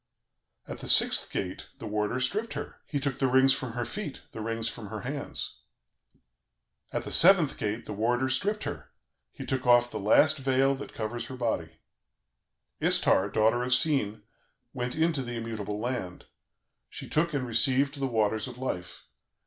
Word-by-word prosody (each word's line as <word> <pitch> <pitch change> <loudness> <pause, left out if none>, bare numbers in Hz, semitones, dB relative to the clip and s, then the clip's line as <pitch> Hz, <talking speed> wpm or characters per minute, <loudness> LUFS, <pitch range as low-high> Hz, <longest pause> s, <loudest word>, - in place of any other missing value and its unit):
"At - - -7
the - - -6
sixth - - +4
gate, - - -4
the - - -9
warder 105 +3 -1
stripped 205 - -1
her; - - -6
he 145 - -2
took 140 -2 -2
the 135 - +2
rings 130 +1 +5
from 125 -3 -4
her 120 0 -2
feet, 195 -9 -6
the 110 - -7
rings 115 +1 -2
from 115 -2 -6
her - - -6
hands. - - -4 1.3
"At - - -2
the - - -6
seventh 175 -5 +6
gate, 110 +2 -3
the 105 - -6
warder 120 +5 +1
stripped 200 +12 0
her; - - -6 0.4
he - - -8
took 130 -2 -2
off 120 0 +5
the 110 - -4
last 145 +9 +4
veil 135 0 +2
that 135 +1 -8
covers 115 +2 -4
her 130 - -7
body. 85 -10 -2 1.0
"Istar, 95 +2 +3
daughter 110 +4 +2
of 125 0 +3
Sin, 125 -7 +1 0.5
went 125 0 -3
into 160 -2 +1
the 120 -1 -5
immutable 110 -3 -4
land, 110 -7 -4 0.6
she - - -8
took 155 0 0
and 130 -2 -1
received 130 +5 +2
the 135 - 0
Waters 110 -1 0
of 125 -1 -9
Life. 90 -9 -5
125 Hz, 170 wpm, -28 LUFS, 110-135 Hz, 1.3 s, seventh